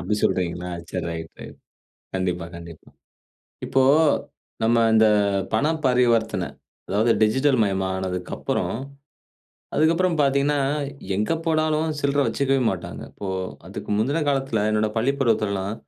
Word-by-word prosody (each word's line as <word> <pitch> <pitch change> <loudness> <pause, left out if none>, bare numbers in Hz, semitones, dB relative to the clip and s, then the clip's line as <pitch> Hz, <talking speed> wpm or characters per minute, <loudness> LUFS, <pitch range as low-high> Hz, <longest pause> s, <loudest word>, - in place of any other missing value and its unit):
அப்டி 95 +5 -1
சொல்கிறீங்களா 90 0 0 0.2
சரி - - -3
ரைட்டு. 80 -1 -8 0.7
கண்டிப்பா, 90 -2 -1
கண்டிப்பா. 85 -2 -11 0.8
இப்போ 135 - +2 0.8
நம்ம 115 +1 +3
இந்த 110 0 +6 0.5
பண 145 - +2 0.2
பரிவர்த்தன 115 -6 +2 0.4
அதாவது 110 +3 +2
டிஜிட்டல் 130 +5 +3
மயமானதுக்கப்புறம் 95 -2 -2 1.0
அதுக்கப்புறம் 165 +3 +2
பாத்தீங்கன்னா, 140 +1 +2 0.6
எங்க 105 +7 0
போனாலும் 155 -1 +1
சில்ற 140 0 0
வச்சுக்கவே 135 -1 +1
மாட்டாங்க. - - -6
இப்போ 100 - -7 0.4
அதுக்கு - - -7
முந்தின 140 +9 +1
காலத்தில, 135 -6 0
என்னோட 110 0 +1
பள்ளிப்பருவத்துலலாம் 110 -6 0
110 Hz, 100 wpm, -23 LUFS, 95-140 Hz, 1.0 s, இந்த